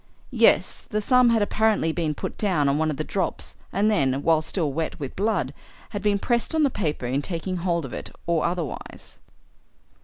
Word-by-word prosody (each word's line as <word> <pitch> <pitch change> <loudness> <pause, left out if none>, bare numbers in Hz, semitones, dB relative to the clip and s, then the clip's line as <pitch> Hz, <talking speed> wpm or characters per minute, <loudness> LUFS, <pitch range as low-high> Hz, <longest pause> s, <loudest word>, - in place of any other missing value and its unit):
"Yes. - - +3
The 210 - 0
thumb 250 +3 +4
had 225 -2 +3
apparently 215 -5 +2
been 160 -2 -1
put - - -5
down 180 -9 +2
on 140 +2 +2
one 160 0 +1
of 150 - -3
the 155 - -1
drops 185 +2 -3 0.2
and 205 +3 +2
then, 135 -8 +1
while 160 -1 +4
still 155 -3 -2
wet 160 +1 -3
with 140 -3 -6
blood, 190 - 0 0.4
had 205 - -4
been 205 0 +2
pressed 240 +8 0
on 315 - +3
the 280 - +3
paper 155 - -2
in 130 +3 0
taking 180 +3 -3
hold 170 -3 -1
of 130 - -8
it - - -6 0.2
or 170 -2 +1
otherwise." 170 -5 -5
170 Hz, 195 wpm, -24 LUFS, 150-210 Hz, 0.4 s, thumb